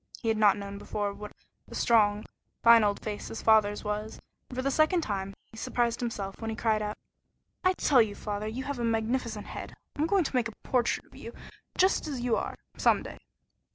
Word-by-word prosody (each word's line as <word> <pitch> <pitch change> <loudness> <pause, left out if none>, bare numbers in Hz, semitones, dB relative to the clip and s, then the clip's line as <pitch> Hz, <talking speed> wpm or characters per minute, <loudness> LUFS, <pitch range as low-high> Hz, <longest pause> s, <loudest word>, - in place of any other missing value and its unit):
He 225 - -1
had 220 - +2
not 210 -1 +5
known 200 0 -6
before 205 -1 -3
what 210 +1 -9 0.4
a - - -8
strong, 210 -2 +3 0.4
fine 230 -1 +8
old 205 -1 +1
face 210 -1 -4
his 225 - -7
father's 215 -2 +4
was, 210 +1 -4 0.3
and 250 - -8
for 255 - -1
the 275 - +1
second 310 +5 +3
time 195 -6 -3 0.2
he 220 - -13
surprised 235 0 0
himself, 205 -5 -4
when 225 - -3
he 220 - -3
cried 220 -1 +1
out: 210 0 -3 0.7
"I 370 0 +4
tell 275 -8 +4
you, 210 -2 -1
father, 210 0 -4
you 240 +5 -4
have 280 -2 -4
a - - -1
magnificent 225 -1 -1
head! - - -8 0.2
I'm 305 +2 +1
going 385 +1 +3
to 275 - -4
make 245 -2 +2
a 225 - -10
portrait 245 -2 0
of - - -24
you - - -9 0.4
just 375 -3 +3
as 280 -4 -3
you 240 -2 +2
are - - -3 0.2
some - - +3
day." - - -9
225 Hz, 215 wpm, -29 LUFS, 210-250 Hz, 0.7 s, fine